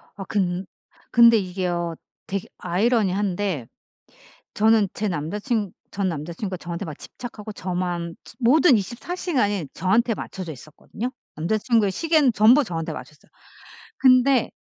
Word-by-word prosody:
아 195 - -6
근 185 -2 -1 0.5
근데 235 -1 +7
이게요. 180 -3 -2 0.3
되게 195 +2 -3
아이러니한데 195 - 0 0.9
저는 220 -1 +4
제 215 - -2
남자 170 +2 -3
친 215 -4 -1 0.2
전 200 -1 -1
남자 165 -1 -4
친구가 185 +1 -4
저한테 170 +2 -5
막 155 -3 -6
집착하고 220 -3 -8
저만 175 -3 -3
치 - - -15
모든 265 +2 +5
24 235 - -4
시간이 205 - 0
저한테 225 +7 +2
맞춰져 185 -4 -6
있었거든요. 155 - -7 0.3
남자 170 +8 0
친구의 215 -3 +2
시계는 310 - +3
전부 230 +7 +6
저한테 165 -8 -4
맞췄어요. - - -11 0.7
근데 255 -1 +5
200 Hz, 300 characters per minute, -23 LUFS, 175-235 Hz, 0.9 s, 근데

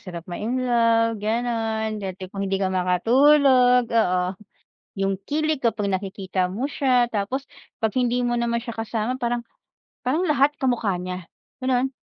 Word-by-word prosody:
sarap 175 -2 -8
ma-in 235 +8 -3
love, 230 -2 +2
ganun. 220 -1 -1
Dati 190 -1 -6
kung 195 - -5
hindi 195 - +1
ka 190 -1 -1
makatulog, 250 +7 +4
oo. 185 -6 +2 0.7
Yung 195 -1 -1
kilig 310 0 0
kapag 225 -5 0
nakikita 190 -1 -2
mo 225 +10 -3
siya. 250 -4 +2
Tapos, 220 +6 -2 0.4
'pag 220 - +2
hindi 245 0 +1
mo 240 0 0
naman 235 0 0
siya 235 - -6
kasama 225 +2 -3
parang 240 -1 -1 0.6
parang 310 +8 +1
lahat 290 0 +3
kamukha 230 -8 0
niya, 180 0 -5 0.4
ganon. 255 0 +2
230 Hz, 145 wpm, -23 LUFS, 195-250 Hz, 0.7 s, makatulog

